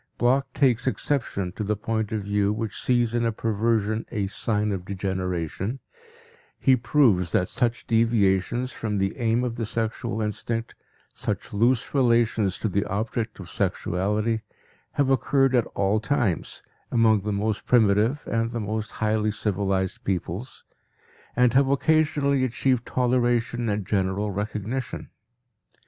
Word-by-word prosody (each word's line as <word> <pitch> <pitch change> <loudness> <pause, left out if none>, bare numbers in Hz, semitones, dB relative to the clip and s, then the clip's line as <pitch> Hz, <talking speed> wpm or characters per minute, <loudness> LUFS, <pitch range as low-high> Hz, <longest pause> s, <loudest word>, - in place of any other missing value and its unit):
Bloch 135 +3 +2
takes 125 -3 +2
exception 110 -6 -1
to 105 - -5
the 105 +1 0
point 110 0 -2
of 110 -2 -2
view 100 0 +1
which 110 -1 -3
sees 120 -2 +2
in 120 0 +1
a 115 - +1
perversion 110 0 0
a 105 -2 -2
"sign 105 +1 -1
of 95 -3 -3
degeneration"; 95 - -3 0.8
he 130 - +4
proves 115 - +2
that 90 - +2
such 120 -2 0
deviations 115 +1 +2
from 105 -3 -3
the 95 0 0
aim 115 +1 +1
of 120 -1 -3
the 115 - -2
sexual 115 +1 -2
instinct, 110 +2 -3 0.4
such - - -4
loose 115 +4 +2
relations 115 -7 +2
to - - -2
the 100 0 0
object 110 +2 -3
of 90 - -8
sexuality, 105 +7 -1 0.5
have 140 -2 +1
occurred 135 0 +2
at 120 -3 +3
all 100 +2 +2
times, 120 - -1 0.3
among 110 -3 +4
the 105 +2 -3
most 105 +1 -2
primitive 110 +3 +3
and 115 0 0
the 120 0 -4
most 110 +1 -3
highly 110 0 0
civilized 100 -3 -1
peoples, 95 +5 -4 0.7
and 125 -1 +4
have 135 +1 +4
occasionally 140 -1 +2
achieved 130 0 0
toleration 120 -2 +1
and 105 -1 -1
general 100 +1 0
recognition. 105 +5 -4
110 Hz, 140 wpm, -25 LUFS, 100-120 Hz, 0.8 s, he